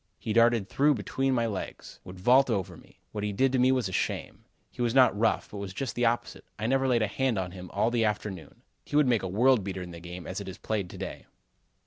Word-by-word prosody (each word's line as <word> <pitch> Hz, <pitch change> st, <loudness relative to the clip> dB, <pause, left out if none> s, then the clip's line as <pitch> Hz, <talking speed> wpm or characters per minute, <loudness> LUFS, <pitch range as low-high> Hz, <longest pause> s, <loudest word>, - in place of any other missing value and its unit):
He 110 Hz, -, -3 dB
darted 115 Hz, -3 st, +4 dB
through 145 Hz, +9 st, +3 dB
between 130 Hz, +5 st, -1 dB
my 115 Hz, -1 st, +1 dB
legs; 105 Hz, -4 st, -6 dB
would 90 Hz, 0 st, -10 dB
vault 130 Hz, +7 st, +5 dB
over 100 Hz, -6 st, -2 dB
me; -, -, -19 dB
what 105 Hz, -, -4 dB
he 105 Hz, -, -1 dB
did 130 Hz, +6 st, +2 dB
to 130 Hz, -, +1 dB
me 130 Hz, +1 st, +5 dB
was 130 Hz, -5 st, +1 dB
a -, -, -6 dB
shame. -, -, -3 dB, 0.3 s
He -, -, -7 dB
was 120 Hz, 0 st, 0 dB
not 130 Hz, -4 st, +6 dB
rough, 110 Hz, +1 st, 0 dB
but 105 Hz, -, -7 dB
was 95 Hz, -1 st, -6 dB
just 130 Hz, -3 st, -3 dB
the 120 Hz, -, 0 dB
opposite. 120 Hz, +1 st, -2 dB
I 110 Hz, -, -4 dB
never 135 Hz, +2 st, +2 dB
laid 120 Hz, -3 st, +3 dB
a -, -, +1 dB
hand 130 Hz, +2 st, 0 dB
on 90 Hz, -2 st, -2 dB
him 90 Hz, -1 st, -9 dB
all 105 Hz, +4 st, +1 dB
the 120 Hz, -1 st, +1 dB
afternoon. 105 Hz, -5 st, -4 dB, 0.2 s
He -, -, -6 dB
would 150 Hz, -1 st, +5 dB
make 120 Hz, -4 st, +3 dB
a 95 Hz, -, -3 dB
world 120 Hz, +4 st, +3 dB
beater 95 Hz, -1 st, -4 dB
in 90 Hz, -, -9 dB
the 85 Hz, -, -9 dB
game 90 Hz, +1 st, -8 dB
as 95 Hz, +2 st, -5 dB
it 100 Hz, -, -7 dB
is 95 Hz, -, -8 dB
played 105 Hz, -5 st, -3 dB
to -, -, -10 dB
day." -, -, -7 dB
110 Hz, 265 wpm, -28 LUFS, 95-125 Hz, 0.3 s, not